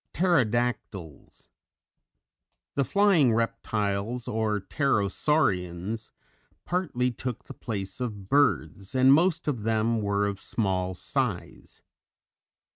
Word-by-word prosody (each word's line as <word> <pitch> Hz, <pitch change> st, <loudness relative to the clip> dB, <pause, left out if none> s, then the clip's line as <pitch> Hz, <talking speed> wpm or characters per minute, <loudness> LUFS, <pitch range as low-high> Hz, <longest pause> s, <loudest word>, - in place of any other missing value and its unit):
Pterodactyls. 120 Hz, -, -1 dB, 1.3 s
The 140 Hz, -, +1 dB
flying 180 Hz, -, +4 dB
Reptiles 110 Hz, 0 st, -2 dB
or 110 Hz, -1 st, 0 dB
Pterosaurians, 105 Hz, -, 0 dB, 0.6 s
partly 150 Hz, -9 st, 0 dB
took 120 Hz, 0 st, -5 dB
the -, -, -10 dB
place 100 Hz, -3 st, -5 dB
of 105 Hz, -6 st, -4 dB
birds, 130 Hz, -5 st, +1 dB
and 130 Hz, +1 st, +6 dB
most 165 Hz, +1 st, +2 dB
of 130 Hz, -7 st, -1 dB
them 115 Hz, +1 st, +1 dB
were 100 Hz, 0 st, +1 dB
of 100 Hz, -1 st, -3 dB
small 95 Hz, -4 st, -1 dB
size. -, -, -4 dB
115 Hz, 95 wpm, -27 LUFS, 100-135 Hz, 1.3 s, and